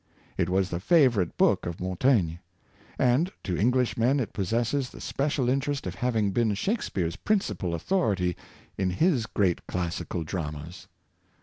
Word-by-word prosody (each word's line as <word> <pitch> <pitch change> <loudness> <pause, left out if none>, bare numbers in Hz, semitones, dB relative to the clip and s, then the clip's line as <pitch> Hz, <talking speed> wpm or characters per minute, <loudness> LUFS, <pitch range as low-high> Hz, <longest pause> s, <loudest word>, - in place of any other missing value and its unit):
It 85 - 0
was 95 0 +1
the 85 - -2
favorite 120 - +3
book - - +3
of 85 -1 -5
Montaigne; 95 -2 +1 0.6
and 130 +8 +2
to 90 - -2
Englishmen 125 +4 +2
it 120 - -3
possesses 120 +6 0
the - - -12
special 140 -2 -1
interest 140 +2 0
of 90 - -3
having 110 0 0
been 110 0 +1
Shaks 210 - -1
peare's 85 -3 -2
principal 190 - -1
authority 95 - 0 0.4
in 95 -1 +1
his 125 - +1
great 95 -4 0
classical 85 -1 -3
dramas. 75 -1 -6
105 Hz, 140 wpm, -27 LUFS, 90-130 Hz, 0.6 s, favorite